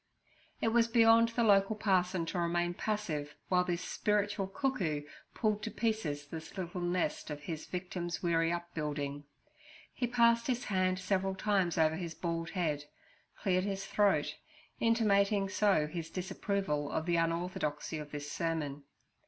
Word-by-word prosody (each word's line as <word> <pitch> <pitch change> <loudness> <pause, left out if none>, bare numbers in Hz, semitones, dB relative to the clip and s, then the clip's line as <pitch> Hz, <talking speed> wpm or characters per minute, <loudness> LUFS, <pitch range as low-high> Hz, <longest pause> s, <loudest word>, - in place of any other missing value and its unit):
It 225 - +3
was 230 0 +4
beyond 230 0 +6
the 235 +1 0
local 200 0 +4
parson 185 -4 +1
to 175 +2 -3
remain 175 0 +1
passive 165 -9 -3
while 180 -1 +4
this 175 -1 -2
spiritual 205 -2 0
cuckoo 195 - -1 0.3
pulled 215 -2 +1
to 220 - -3
pieces 205 -11 -1
this 160 +5 -8
little 180 0 -4
nest 175 -1 -1
of 150 -1 -5
his 160 0 -5
victim's 180 -1 -4
weary 165 -1 +2
upbuilding. 150 -4 -3 0.7
He 245 - -1
passed 235 -1 +4
his 245 -2 0
hand 185 -2 +1
several 190 0 0
times 190 -4 +1
over 160 0 +3
his 170 -3 -5
bald 165 -1 -2
head, 150 -5 -1 0.6
cleared 185 -2 +2
his 195 -1 -3
throat, 190 -9 +2 0.4
intimating 205 -3 +3
so 195 -6 +3
his 165 +1 -5
disapproval 185 -4 -2
of 160 - -1
the 175 -1 +2
unorthodoxy 165 -2 -1
of 150 -1 -7
this 145 0 -6
sermon. 155 -4 -2
180 Hz, 145 wpm, -33 LUFS, 165-205 Hz, 0.7 s, beyond